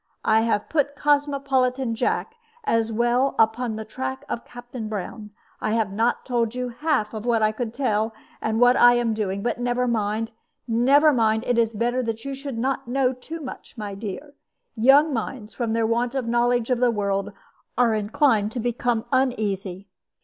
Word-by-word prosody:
I 220 0 +4
have 225 -2 0
put 285 -2 0
Cosmopolitan 275 -4 +1
Jack 340 - -1 0.3
as 230 - +1
well 240 +4 +1
upon 225 +1 +2
the 220 0 -6
track 130 -10 -5
of 235 - -4
Captain 245 -2 -8
Brown. 210 +1 -5 0.3
I 215 - 0
have 220 -4 0
not 225 +4 0
told 235 -2 0
you 250 0 -2
half 245 -3 -1
of 215 -1 -5
what 230 -2 +2
I 215 - +3
could 220 +1 -4
tell, 220 -4 0 0.3
and 220 0 -1
what 245 +1 +6
I 245 -1 +7
am 240 -2 +1
doing; 200 -2 -2
but 240 0 -1
never 245 +1 0
mind, 220 -1 -1 0.4
never 275 +6 +4
mind; 220 -2 +2
it 245 -1 +2
is 230 -1 +2
better 240 +3 0
that 225 0 -4
you 275 - -3
should 270 -2 -6
not 260 +1 -1
know 260 +1 +1
too 315 +6 -8
much, 265 -2 -9
my 205 -2 -5
dear. 215 +8 -7 0.4
Young 275 +6 +5
minds, 225 -2 -4
from 230 -3 -2
their 225 0 +1
want 235 +3 0
of 265 -3 -1
knowledge 240 +1 +1
of 250 - +2
the 250 -1 +4
world, 200 -3 -1 0.5
are 240 -2 +4
inclined 215 0 +2
to 250 - -3
become 240 0 -1
uneasy. 205 -8 -1
235 Hz, 180 wpm, -24 LUFS, 220-255 Hz, 0.5 s, I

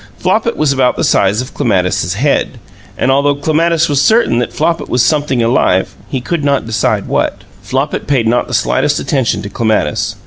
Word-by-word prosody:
Flopit 220 +6 0
was 150 -2 +1
about 130 -2 +1
the - - -2
size 100 +4 +2
of 125 - -9
Clematis's 90 -4 0
head, 135 +2 0 0.4
and 135 - +1
although 140 +1 +2
Clematis 160 +3 +1
was 145 -2 +1
certain 220 - +3
that 125 - -2
Flopit 165 +2 -1
was 125 -1 +2
something 145 -3 +1
alive, 115 -6 +1
he 130 - -2
could 150 +5 -3
not 140 -3 +1
decide 115 -1 -1
what. - - -2 0.2
Flopit 135 +3 -3
paid 135 -5 +1
not 120 +2 +1
the - - -2
slightest 60 +1 +1
attention 120 -7 -1
to 100 - -6
Clematis. 110 -9 -1
130 Hz, 180 wpm, -14 LUFS, 115-150 Hz, 0.4 s, certain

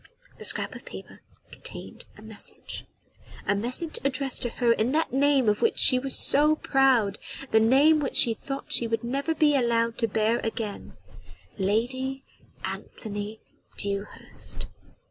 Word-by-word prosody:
The - - -6
scrap - - +1
of - - -11
paper - - -11 0.3
contained - - -8
a - - -14
message - - -9 0.6
a - - +2
message 250 - -2
addressed 270 -1 -1
to 240 - -1
her 235 0 +1
in 230 +4 -1
that 320 -4 0
name 275 -2 +3
of 210 0 +1
which 455 - +1
she 255 - +6
was 270 0 +2
so 300 +2 +6
proud 260 -9 +2 0.3
the 220 - +5
name 275 +8 +4
which 280 - -3
she 230 - +7
thought 275 +5 -5
she 235 - +4
would 230 +1 -2
never 275 +7 -2
be 295 -1 +3
allowed 230 -3 +1
to 230 - +1
bear 220 +2 +1
again: 220 -2 -5 0.6
Lady 260 +7 -1 0.4
Anthony 210 0 -7 0.4
Dewhurst. 200 0 -5
245 Hz, 145 wpm, -26 LUFS, 220-275 Hz, 0.6 s, she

